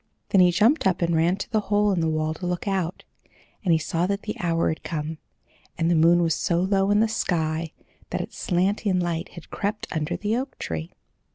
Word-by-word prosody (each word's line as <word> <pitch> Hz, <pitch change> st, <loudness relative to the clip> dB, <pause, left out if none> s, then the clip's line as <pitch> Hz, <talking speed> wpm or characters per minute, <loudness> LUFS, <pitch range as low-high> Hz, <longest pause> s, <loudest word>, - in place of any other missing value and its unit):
Then 195 Hz, -, +5 dB
he 180 Hz, -, +6 dB
jumped 215 Hz, -, +3 dB
up 180 Hz, -2 st, +1 dB
and 170 Hz, 0 st, +1 dB
ran 165 Hz, +3 st, +3 dB
to 200 Hz, -, -5 dB
the 220 Hz, -, +2 dB
hole 205 Hz, 0 st, +3 dB
in 185 Hz, -, +1 dB
the 165 Hz, -1 st, +1 dB
wall 155 Hz, 0 st, 0 dB
to 180 Hz, +3 st, -5 dB
look 180 Hz, +3 st, -3 dB
out, 190 Hz, -2 st, -1 dB, 0.6 s
and 185 Hz, -, +2 dB
he 165 Hz, -, +5 dB
saw 165 Hz, +3 st, -1 dB
that 200 Hz, +1 st, -2 dB
the 210 Hz, -, -4 dB
hour 170 Hz, -1 st, +1 dB
had 160 Hz, -, -3 dB
come, 155 Hz, 0 st, -4 dB, 0.6 s
and 165 Hz, 0 st, +1 dB
the -, -, +4 dB
moon 170 Hz, +2 st, +5 dB
was 165 Hz, -1 st, +2 dB
so 170 Hz, +2 st, 0 dB
low 195 Hz, +1 st, +2 dB
in 205 Hz, +1 st, +4 dB
the 225 Hz, -, +4 dB
sky 160 Hz, -6 st, -1 dB, 0.4 s
that -, -, -2 dB
its -, -, -8 dB
slanting 185 Hz, +1 st, +1 dB
light 170 Hz, -2 st, -2 dB
had 170 Hz, -3 st, -12 dB
crept 210 Hz, +1 st, -2 dB
under 155 Hz, -2 st, -2 dB
the 210 Hz, +2 st, -1 dB
oak 265 Hz, +3 st, -4 dB
tree. 80 Hz, 0 st, -5 dB
175 Hz, 220 wpm, -25 LUFS, 165-200 Hz, 0.6 s, he